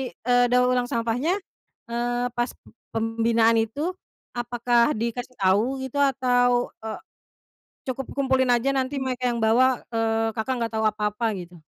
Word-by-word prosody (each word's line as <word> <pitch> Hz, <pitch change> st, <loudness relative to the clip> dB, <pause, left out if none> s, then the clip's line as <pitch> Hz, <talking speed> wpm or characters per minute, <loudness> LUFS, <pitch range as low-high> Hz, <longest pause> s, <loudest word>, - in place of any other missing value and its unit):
eee, 245 Hz, +1 st, +3 dB
daur 250 Hz, +1 st, +3 dB
ulang 250 Hz, -1 st, +1 dB
sampahnya, 235 Hz, +9 st, 0 dB, 0.6 s
eee, 240 Hz, +1 st, -1 dB
pas 240 Hz, +1 st, -1 dB
p -, -, -41 dB, 0.3 s
pembinaan 225 Hz, 0 st, +2 dB
itu, 280 Hz, +10 st, -1 dB, 0.4 s
apakah 240 Hz, +2 st, +1 dB
dikasih 235 Hz, +3 st, -4 dB
tau 205 Hz, +8 st, +3 dB
gitu, 265 Hz, +2 st, -3 dB
atau, 245 Hz, -3 st, +2 dB
eee, 220 Hz, -1 st, -5 dB, 0.9 s
cukup 260 Hz, +1 st, -3 dB
kumpulin 260 Hz, -2 st, +2 dB
aja, 240 Hz, +3 st, +1 dB
nanti 265 Hz, +1 st, -1 dB
mereka 255 Hz, -1 st, -2 dB
yang 240 Hz, -2 st, 0 dB
bawa, 245 Hz, +3 st, +3 dB
eee, 225 Hz, -1 st, 0 dB
Kakak, 225 Hz, +4 st, -1 dB
nggak 230 Hz, -1 st, -1 dB
tau 220 Hz, -, +1 dB
apa-apa 210 Hz, +1 st, 0 dB
gitu? 180 Hz, -2 st, -8 dB
240 Hz, 145 wpm, -24 LUFS, 225-255 Hz, 0.9 s, eee